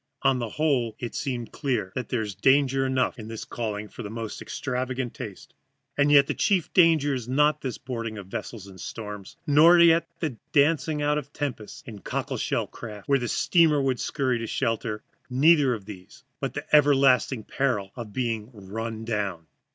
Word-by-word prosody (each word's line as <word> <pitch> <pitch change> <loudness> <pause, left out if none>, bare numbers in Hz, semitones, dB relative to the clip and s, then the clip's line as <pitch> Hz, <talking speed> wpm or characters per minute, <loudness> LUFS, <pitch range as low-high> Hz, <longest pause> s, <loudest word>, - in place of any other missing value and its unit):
On 130 -1 +3
the 120 -2 -3
whole 130 -6 0
it 120 - -5
seemed 125 -4 -3
clear 125 -10 -2
there 125 -2 -2
is 105 -2 -5
danger 135 +4 +3
enough 130 -1 0
in 110 - -8
this 115 -1 -6
calling 105 -3 -4
for 120 - -10
the 105 - -6
most 115 0 -6
extravagant 130 -1 -3
taste. 100 -4 -9 0.4
And 145 0 +3
the 140 -1 +5
chief 190 -6 +1
danger 160 -5 +4
is 125 -2 -4
not 150 +3 +3
this 130 -3 -4
boarding 115 -4 -5
of 100 - -7
vessels 100 +2 -6
in 95 -1 -13
storms, 105 - -7
nor 160 +4 +7
yet 165 -1 +5
the 150 -9 -3 0.2
dancing 150 0 +2
out 150 0 +2
of 145 -1 -11
tempests 125 -7 -5
in 110 -4 -9
cockle - - -3
shell - - -1
craft, 105 -4 -10
where 140 -3 +2
a - - -1
steamer 160 - +3
would 130 -3 0
scurry 130 -3 -1
to 115 - -4
shelter; 115 -2 -2 0.3
neither 145 +1 +5
of 105 -4 -10
these, 95 -3 -12 0.2
but - - -3
the - - -4
everlasting 135 -4 +4
peril 110 -9 -1
of 115 -4 -7
being 115 -2 -2
run 110 +1 -6
down. 100 -7 -2
125 Hz, 180 wpm, -26 LUFS, 110-140 Hz, 0.4 s, nor